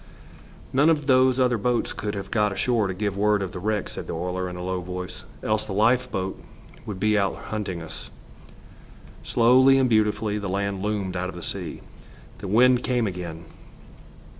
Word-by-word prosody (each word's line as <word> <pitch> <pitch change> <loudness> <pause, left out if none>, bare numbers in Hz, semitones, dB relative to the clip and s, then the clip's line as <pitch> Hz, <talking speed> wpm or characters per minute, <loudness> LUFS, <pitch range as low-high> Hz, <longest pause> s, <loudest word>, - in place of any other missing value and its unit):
"None 145 +5 +5
of 150 -3 +2
those 130 -1 +4
other 125 -3 +2
boats 120 +3 0
could 105 0 -4
have 100 0 -6
got 105 -3 +2
ashore 110 +1 +1
to 95 - -2
give 100 0 -2
word 105 0 +2
of 95 - -4
the 95 - -6
wreck," 105 +2 -1
said - - -7
the - - -4
oiler, 90 +2 -2
in 90 - -7
a 90 - -6
low 95 0 -2
voice. 90 +1 -6 0.2
"Else 110 0 +1
the 95 - -5
lifeboat 110 -3 +1 0.5
would 100 -3 -5
be 105 +1 +3
out 100 -1 0 0.2
hunting 95 -6 -3
us." 80 -1 -8 1.1
Slowly 130 +3 +5
and 130 -1 +3
beautifully 105 -2 +1
the 100 -2 -4
land 100 0 -2
loomed 100 -3 -2
out 90 +1 -2
of - - -8
the 85 - -8
sea. - - -4 0.6
The - - -6
wind 125 +5 +5
came 125 -2 +1
again. 85 -4 -5
105 Hz, 185 wpm, -25 LUFS, 95-120 Hz, 1.1 s, None